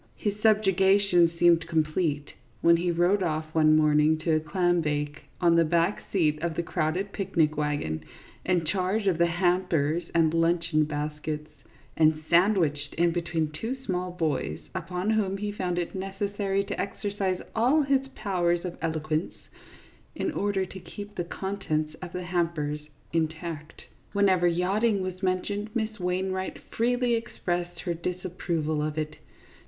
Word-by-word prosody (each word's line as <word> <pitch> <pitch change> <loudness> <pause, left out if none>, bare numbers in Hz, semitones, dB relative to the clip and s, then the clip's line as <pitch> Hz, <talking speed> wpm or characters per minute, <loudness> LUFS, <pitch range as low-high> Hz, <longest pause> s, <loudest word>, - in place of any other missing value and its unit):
His 205 - -1
subjugation 195 -4 +4
seemed 170 -1 +4
complete 155 -2 0 0.3
when 170 0 +6
he 175 +1 0
rode 175 +4 +2
off 155 -2 -2
one 155 -1 +5
morning 150 0 +4
to 160 -1 +2
a - - +3
clambake, 155 -3 0
on 170 -2 +4
the 170 - +5
back 170 +4 +1
seat 155 -5 +1
of 170 -1 -2
the 170 - -1
crowded 170 +5 -1
picnic 170 -7 +1
wagon, 145 - -2 0.4
in 175 -3 +1
charge 195 +4 0
of 180 -4 +2
the 170 - +5
hampers 175 -2 +1
and 160 -1 +4
luncheon 165 -2 +2
baskets, 150 0 -4 0.4
and 155 -1 +3
sandwiched 170 -6 +3
in 170 0 +3
between 165 -2 -1
two 225 +12 -4
small 180 -1 -1
boys, 150 - -1
upon 180 +3 -2
whom 200 -3 +1
he 205 +1 -3
found 180 -3 -2
it 175 -1 -2
necessary 195 +1 -1
to 200 +1 -3
exercise 200 -2 -2 0.2
all 255 +7 +4
his 270 -1 +1
powers 175 -4 0
of 175 - -6
eloquence 155 0 -1 0.8
in 360 - -1
order 200 -7 0
to 190 +1 -9
keep 205 +3 -9
the 175 - -2
contents 170 -4 -3
of 180 -2 -6
the 180 0 -4
hampers 170 -4 -1 0.3
intact. 160 -1 -3 0.3
Whenever 190 -3 +4
yachting 195 +4 +1
was 185 0 -5
mentioned, 200 +3 -1
Miss 220 -2 -2
Wain 180 +1 -1
wright 185 0 -3 0.2
freely 245 +1 +2
expressed 175 -6 -3
her 175 - -2
disapproval 170 -3 -2
of 150 0 -2
it. 155 0 -3
175 Hz, 150 wpm, -27 LUFS, 155-195 Hz, 0.8 s, when